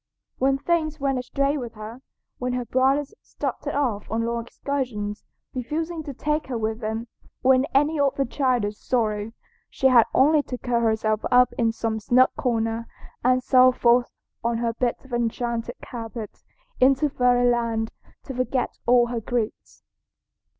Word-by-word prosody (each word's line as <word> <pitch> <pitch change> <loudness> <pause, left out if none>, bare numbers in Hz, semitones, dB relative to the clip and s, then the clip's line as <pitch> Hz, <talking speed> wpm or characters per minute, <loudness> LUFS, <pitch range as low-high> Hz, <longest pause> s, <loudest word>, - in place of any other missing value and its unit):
When 270 +1 +3
things 310 +1 -1
went 270 -2 0
astray 275 +3 0
with 240 -3 -7
her, 215 +4 -9 0.4
when 250 0 -2
her 250 -1 -2
brothers 270 - +1
started - - -4
off 240 -8 -1
on 230 +1 -1
long 235 0 -3
excursions, 235 -9 -3 0.3
refusing 315 +6 -3
to 285 - -5
take 300 +3 -1
her 250 -3 -3
with 220 0 -2
them, 220 0 -3 0.4
or 265 +1 +6
in 260 +1 +3
any 295 +1 +1
other 275 -1 +2
childish 245 -6 0
sorrow, 215 -3 -1 0.4
she 265 - +2
had 240 -3 +6
only 300 +3 +5
to 255 -3 -6
curl 240 -1 0
herself 220 -1 +1
up 250 0 +5
in 230 -2 +2
some 225 -1 -2
snug 250 +4 +4
corner 230 -2 -1 0.4
and 255 +1 +3
sail 255 0 +6
forth 240 0 +3 0.3
on 235 0 0
her 230 0 -1
bit 240 +2 -2
of 265 - -13
enchanted 235 0 -2
carpet 225 -2 -7 0.4
into 270 +3 +4
fairyland 245 -3 +1 0.3
to 270 - -7
forget 255 0 -2
all 245 0 +5
her 240 -1 -3
griefs. 230 -1 -4
245 Hz, 155 wpm, -24 LUFS, 230-265 Hz, 0.4 s, or